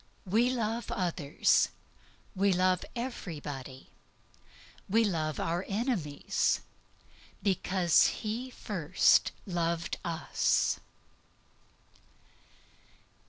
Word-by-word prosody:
We 225 Hz, +6 st, +3 dB
love 235 Hz, -2 st, -2 dB
others, 170 Hz, -6 st, +2 dB, 0.7 s
we 195 Hz, +1 st, +3 dB
love 185 Hz, 0 st, +2 dB
everybody, 145 Hz, -, -6 dB, 1.0 s
we 225 Hz, +4 st, +4 dB
love 155 Hz, -7 st, -1 dB
our 170 Hz, +2 st, -1 dB
enemies, 200 Hz, -, 0 dB, 0.8 s
because 185 Hz, -3 st, +3 dB
He 230 Hz, +4 st, -3 dB
first 185 Hz, -8 st, +2 dB
loved 170 Hz, -2 st, -1 dB
us. 165 Hz, -3 st, +1 dB
185 Hz, 70 wpm, -30 LUFS, 165-215 Hz, 1.0 s, we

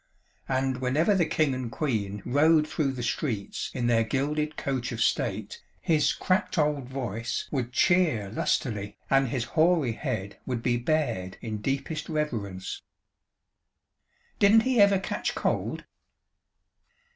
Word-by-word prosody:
And 130 Hz, 0 st, 0 dB
whenever 135 Hz, +10 st, +2 dB
the 175 Hz, -4 st, +2 dB
King 155 Hz, -4 st, +1 dB
and 130 Hz, -3 st, -4 dB
Queen 105 Hz, -9 st, -2 dB
rode 155 Hz, +3 st, +4 dB
through 145 Hz, -3 st, -1 dB
the 125 Hz, -2 st, -5 dB
streets 115 Hz, -6 st, -2 dB
in 125 Hz, -, -2 dB
their 115 Hz, -1 st, +3 dB
gilded 150 Hz, +6 st, -1 dB
coach 130 Hz, -3 st, -2 dB
of 115 Hz, -, -5 dB
state, -, -, -1 dB, 0.2 s
his 155 Hz, -3 st, +2 dB
cracked 185 Hz, +1 st, 0 dB
old 150 Hz, -4 st, +1 dB
voice 120 Hz, -4 st, -3 dB
would 125 Hz, -4 st, -2 dB
cheer 155 Hz, -, +2 dB
lustily, 105 Hz, -2 st, -1 dB
and 135 Hz, 0 st, +4 dB
his 120 Hz, 0 st, -1 dB
hoary 160 Hz, -5 st, +3 dB
head 110 Hz, -5 st, -4 dB
would 120 Hz, -3 st, -2 dB
be 120 Hz, -1 st, +2 dB
bared 120 Hz, -9 st, -1 dB
in 110 Hz, -2 st, -4 dB
deepest 140 Hz, +5 st, -2 dB
reverence." 110 Hz, -, -3 dB, 1.6 s
"Didn't 210 Hz, +2 st, +6 dB
he 255 Hz, -2 st, +3 dB
ever 200 Hz, -1 st, +6 dB
catch 190 Hz, -, -3 dB
cold?" -, -, -1 dB
135 Hz, 135 wpm, -27 LUFS, 115-155 Hz, 1.6 s, Didn't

